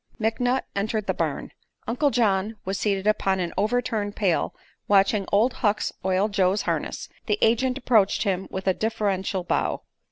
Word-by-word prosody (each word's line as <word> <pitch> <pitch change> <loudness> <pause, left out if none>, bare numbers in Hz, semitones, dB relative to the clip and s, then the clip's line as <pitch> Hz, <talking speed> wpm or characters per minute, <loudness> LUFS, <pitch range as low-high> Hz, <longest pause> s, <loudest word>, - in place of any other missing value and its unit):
McNutt 245 +4 +1
entered 215 +1 -1
the - - 0
barn. - - -3 0.4
Uncle 270 +5 +2
John 215 -4 +1
was 190 +1 -2
seated 195 -2 0
upon 195 -3 +2
an 175 -2 -2
overturned 215 -1 -1
pail 190 -6 0 0.3
watching 200 0 +3
Old 225 +5 +3
Hucks 210 -1 +1
oil 190 +2 +2
Joe's 200 -1 +1
harness. - - -3 0.2
The 420 - +1
agent 250 +3 +2
approached 225 -7 +3
him 190 -3 -1
with 190 0 -5
a 190 - +3
deferential 200 -3 -1
bow. - - -1
205 Hz, 155 wpm, -25 LUFS, 195-225 Hz, 0.4 s, watching